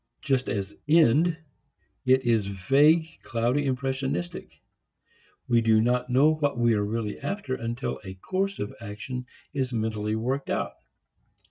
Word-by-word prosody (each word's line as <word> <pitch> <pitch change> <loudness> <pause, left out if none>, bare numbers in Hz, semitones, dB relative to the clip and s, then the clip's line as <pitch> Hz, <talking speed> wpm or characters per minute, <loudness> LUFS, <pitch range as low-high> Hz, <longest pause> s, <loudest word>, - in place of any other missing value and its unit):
Just 135 -3 +1
as 100 0 -3
end, 160 +2 +4 0.7
it 130 0 +4
is 115 -4 +2
vague, 145 - +3
cloudy, 125 +5 0
impressionistic. 130 -8 -3 0.9
We 120 -1 +4
do 110 -1 +4
not 125 +2 +1
know 140 +5 +5
what 145 -4 -1
we 120 -1 +3
are 105 -1 +1
really 105 0 -3
after 195 -9 -3
until 120 0 -3
a 95 -2 -8
course 190 - -2
of 105 - -4
action 115 +4 -6 0.3
is 130 -3 -1
mentally 110 -2 -1
worked 130 +5 -2
out. - - -1
125 Hz, 135 wpm, -27 LUFS, 110-140 Hz, 0.9 s, know